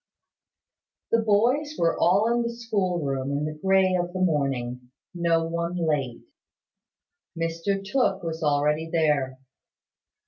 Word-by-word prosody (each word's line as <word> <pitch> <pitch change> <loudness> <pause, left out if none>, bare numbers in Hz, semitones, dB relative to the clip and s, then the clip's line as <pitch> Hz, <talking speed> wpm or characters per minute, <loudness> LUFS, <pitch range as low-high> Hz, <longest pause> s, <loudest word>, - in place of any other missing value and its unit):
The 230 - +4
boys 240 +8 +2
were 165 0 +2
all 205 +6 +3
in 240 - +1
the 235 - -1
school 200 -8 -2
room 135 0 -2
in 145 +1 -1
the 155 - -3
grey 190 +3 +2
of 175 -1 -1
the 185 - -3
morning; 135 -7 -1 0.2
no 170 -2 +1
one 170 +1 -3
late. 150 -8 -1 1.1
Mr 165 +4 -2
Tooke 245 -2 0
was 165 0 -4
already 150 +1 +1
there. 145 -5 +1
170 Hz, 130 wpm, -25 LUFS, 150-195 Hz, 1.1 s, The